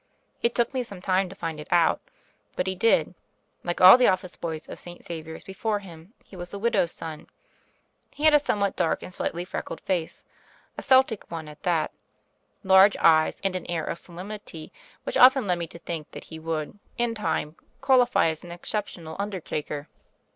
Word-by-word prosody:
It 235 - +1
took 240 +2 +1
me 260 - 0
some 200 -6 -7
time 185 0 +1
to 195 - -10
find 165 -4 -5
it 150 - -8
out; 170 -2 +3 0.5
but 180 - -1
he 190 - -1
did. 210 +5 +2 0.5
Like 175 0 -2
all 185 +7 +10
the 250 - +5
office 185 -1 0
boys 160 -2 -5
of - - -9
St. 175 0 -11
Xavier's 160 -1 -7
before 205 +2 -2
him 180 0 -12
he - - -14
was 175 -1 -7
a 200 - -5
widow's 200 -5 +1
son. 160 -2 -7 0.8
He 295 - -9
had 310 -1 +6
a 295 - +7
somewhat 200 -8 0
dark 170 -2 0
and 185 - -9
slightly 175 0 -3
freckled - - -5
face 175 -4 -3 0.3
— - - -32
a - - -5
Celtic 260 -5 +3
one 165 -2 -6
at 150 0 -12
that 170 -3 0 0.4
— - - -45
large 195 +2 +7
eyes, 155 -1 +4
and 195 -1 -1
an 180 - -4
air 165 -3 -1
of - - -3
solemnity 180 -2 -9 0.3
which - - -2
often 260 -1 +7
led 180 -2 0
me 170 - -3
to 170 - -12
think 165 -2 -6
that - - -8
he 160 - -10
would, 160 +3 -4 0.2
in 240 -1 +1
time, 165 -8 -2 0.2
qualify 255 -8 +4
as 160 -1 -5
an 175 - -9
exceptional 175 -3 -5
undertaker. 155 -7 -4
180 Hz, 195 wpm, -26 LUFS, 165-210 Hz, 0.8 s, all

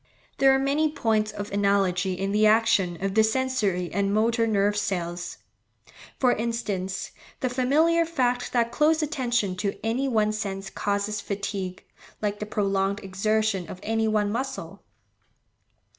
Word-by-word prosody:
There 270 0 +6
are 270 - +4
many 285 +3 +1
points 215 -6 0
of 205 -1 -6
analogy 195 -2 +1
in 195 +2 -2
the 215 +1 +4
action 210 -5 +3
of 195 - -1
the 220 +1 +5
sensory 220 -7 0
and 200 +1 +1
motor 230 +2 +2
nerve 205 -1 +2
cells; 175 -4 -3 0.8
for 250 -2 +4
instance, 210 -5 -3 0.3
the 255 - 0
familiar 305 +7 +3
fact 250 -7 -1
that 235 -1 +1
close 315 +1 +3
attention 240 -10 0
to 200 +1 -2
any 245 +5 0
one 215 -4 +2
sense 195 -2 -4
causes 205 +1 -1
fatigue, 200 -2 -4 0.4
like 205 -1 -2
the 210 - -4
prolonged 200 -1 0
exertion 200 -1 0
of 185 - -8
any 225 0 0
one 210 -1 +1
muscle. 265 +4 -4
215 Hz, 145 wpm, -26 LUFS, 195-245 Hz, 0.8 s, There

